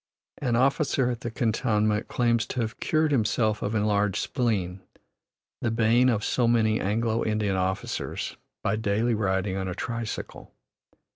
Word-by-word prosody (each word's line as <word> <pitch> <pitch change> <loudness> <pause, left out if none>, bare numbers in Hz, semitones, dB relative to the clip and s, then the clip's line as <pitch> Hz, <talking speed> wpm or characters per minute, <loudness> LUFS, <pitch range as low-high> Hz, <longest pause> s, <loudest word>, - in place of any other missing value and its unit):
An 125 -4 0
officer 135 0 +2
at 120 - -5
the 120 - -3
cantonment 110 -2 0
claims 115 -2 +1
to 125 - -2
have 110 -1 -4
cured 155 -1 +1
himself 110 -3 +1
of 105 +2 -2
enlarged 105 -2 +1
spleen, 100 -8 -1 0.8
the 120 - +1
bane 115 +3 +3
of 110 -3 0
so 120 +1 +1
many 110 -2 +3
Anglo 110 +3 0
Indian 105 -3 0
officers, 95 +1 -2 0.3
by 110 - +1
daily 110 +2 +1
riding 95 -2 0
on 95 -1 -2
a 90 - -4
tricycle. 115 +1 -5
110 Hz, 145 wpm, -26 LUFS, 105-120 Hz, 0.8 s, bane